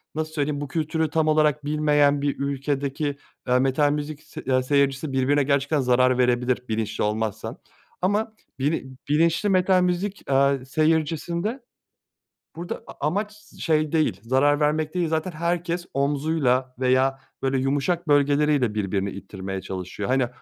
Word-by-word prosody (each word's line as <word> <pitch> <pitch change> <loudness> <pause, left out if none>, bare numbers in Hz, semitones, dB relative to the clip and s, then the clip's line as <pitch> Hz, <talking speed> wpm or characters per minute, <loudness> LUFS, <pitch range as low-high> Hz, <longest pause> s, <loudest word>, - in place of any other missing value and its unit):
nasıl 155 0 -3
söyleyeyim, 145 -1 -1
bu 145 - -4
kültürü 160 +1 -1
tam 160 0 +1
olarak 150 -1 +2
bilmeyen 145 -1 +3
bir 140 -1 -1
ülkedeki, 140 +1 -2 0.3
eee, 125 0 +3
metal 135 +2 +2
müzik 150 +1 -4
s 155 - -10
aaa 130 - +3
seyircisi 140 +1 +1
birbirine 135 +2 +2
gerçekten 140 +2 +1
zarar 125 0 +3
verebilir 125 0 +1
bilinçli 110 0 -2
olmazsa 110 +2 -2 0.4
ama 210 +4 0 0.3
bilin 130 -2 -2
bilinçli 165 +6 +2
metal 185 -1 +3
müzik, 180 +3 -1
eee, 135 -1 +2
seyircisinde, 165 - 0 0.9
burada 175 +1 -6
a 145 - -5
amaç 205 +6 -1 0.3
şey 155 -2 +1
değil, 155 - +1
zarar 135 +5 +2
vermek 155 +1 0
değil, 175 -2 0
zaten 160 +3 -1
herkes 170 +2 -2
omzuyla 140 -2 +1
veya 130 +1 +2 0.2
böyle 135 0 +1
yumuşak 145 +6 0
bölgeleriyle 145 -4 +3
birbirini 100 -1 -1
ittirmeye 95 -1 -6
çalışıyor. 95 +2 -5
Hani, 130 -2 +2
145 Hz, 140 wpm, -24 LUFS, 130-155 Hz, 0.9 s, bilmeyen